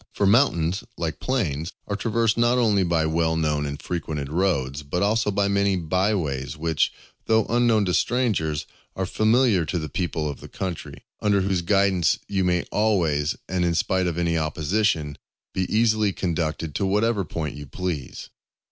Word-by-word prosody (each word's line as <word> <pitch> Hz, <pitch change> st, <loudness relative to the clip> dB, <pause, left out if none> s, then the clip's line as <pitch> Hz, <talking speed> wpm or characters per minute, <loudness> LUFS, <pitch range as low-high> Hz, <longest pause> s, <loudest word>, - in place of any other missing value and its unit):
For 100 Hz, -, +1 dB
mountains, 95 Hz, -, +3 dB
like 85 Hz, -1 st, -3 dB
plains, 85 Hz, -, -2 dB
are 100 Hz, -, -3 dB
traversed 115 Hz, +1 st, +1 dB
not 120 Hz, +1 st, +3 dB
only 110 Hz, -5 st, +3 dB
by 85 Hz, -3 st, +1 dB
well 80 Hz, +1 st, +1 dB
known 75 Hz, -2 st, 0 dB
and 70 Hz, 0 st, -5 dB
frequented 75 Hz, -5 st, -4 dB
roads, 75 Hz, -6 st, 0 dB
but 75 Hz, +6 st, -2 dB
also 110 Hz, +1 st, +2 dB
by 100 Hz, 0 st, +1 dB
many 100 Hz, 0 st, +2 dB
by 95 Hz, +5 st, +1 dB
ways, 70 Hz, -4 st, -3 dB
which, 80 Hz, -1 st, +1 dB, 0.4 s
though 110 Hz, -1 st, +3 dB
unknown 115 Hz, -3 st, +2 dB
to 90 Hz, -, 0 dB
strangers, 90 Hz, -, 0 dB, 0.3 s
are 95 Hz, -, -1 dB
familiar 110 Hz, -1 st, +3 dB
to 90 Hz, -, -2 dB
the 80 Hz, -2 st, -4 dB
people 85 Hz, -4 st, -2 dB
of 70 Hz, -3 st, -5 dB
the -, -, -10 dB
country, 90 Hz, -4 st, -6 dB, 0.2 s
under 100 Hz, -2 st, +3 dB
whose 95 Hz, -2 st, 0 dB
guidance 95 Hz, -1 st, +2 dB
you 95 Hz, -2 st, 0 dB
may 90 Hz, -1 st, +1 dB
always, 85 Hz, -9 st, +1 dB
and 90 Hz, -1 st, -1 dB
in 85 Hz, -1 st, +1 dB
spite 95 Hz, +1 st, +1 dB
of 85 Hz, -1 st, -2 dB
any 85 Hz, -1 st, +1 dB
opposition, 80 Hz, 0 st, 0 dB, 0.3 s
be 95 Hz, -1 st, -2 dB
easily 110 Hz, -2 st, +3 dB
conducted 80 Hz, -4 st, -2 dB
to 100 Hz, -, -1 dB
whatever 105 Hz, +1 st, +1 dB
point 75 Hz, -2 st, -4 dB
you 75 Hz, 0 st, -8 dB
please. 85 Hz, -3 st, -5 dB
90 Hz, 170 wpm, -24 LUFS, 80-105 Hz, 0.4 s, mountains